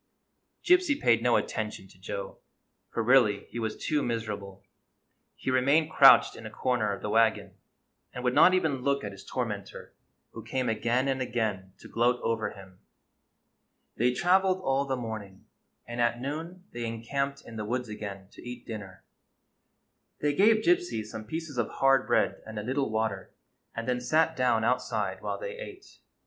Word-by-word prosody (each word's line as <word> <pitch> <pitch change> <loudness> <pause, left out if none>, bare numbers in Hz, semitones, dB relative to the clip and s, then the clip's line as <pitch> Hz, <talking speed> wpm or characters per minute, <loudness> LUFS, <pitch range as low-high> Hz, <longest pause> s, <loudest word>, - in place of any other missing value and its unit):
Gypsy 360 -5 +4
paid 115 -1 +3
no 120 0 +3
attention 105 -3 -2
to 95 - -20
Joe, 95 +1 -6 0.5
for 115 - -2
really 110 -5 +4
he 120 - -5
was 110 -1 -3
too 150 -1 0
miserable. 105 -5 -4 0.7
He 130 - -3
remained 140 +5 +3
crouched 135 -3 +7
in - - -10
a 110 - -6
corner 115 -2 0
of 100 - -6
the 105 - -2
wagon, 115 0 +2 0.6
and 125 - -7
would 125 -1 +1
not 185 - +6
even 155 -8 0
look 140 +1 0
at 105 - -4
his 100 - -12
tormentor, 105 -6 -5 0.4
who - - -9
came 130 -2 -2
again 120 +4 +1
and 135 -1 0
again 110 -7 -2
to - - -11
gloat 120 +1 +1
over 115 -1 0
him. 95 -2 -14 1.2
They 125 +2 +2
traveled 185 +6 +2
all 135 +1 +1
the 135 -1 -1
morning, 110 -5 -7 0.4
and 120 0 -3
at 120 0 +1
noon 160 +7 -5
they 120 0 -4
encamped 140 +5 -3
in 115 - -10
the 105 - -3
woods 125 +3 -2
again 100 -3 -7
to - - -14
eat 120 0 -8
dinner. 100 -5 -8 1.2
They 145 0 +1
gave 215 +6 +4
Gypsy 350 - +1
some 110 0 -8
pieces 155 +1 -5
of 120 - 0
hard 135 -1 +3
bread - - +1
and 110 -1 -8
a 105 - -3
little 135 +3 -1
water, 110 -3 -2 0.4
and 115 +1 -4
then 125 -1 0
sat 160 +6 +2
down 125 -3 +2
outside 125 +3 -1
while - - -3
they - - -7
ate. 405 -5 -11
120 Hz, 170 wpm, -28 LUFS, 110-140 Hz, 1.2 s, crouched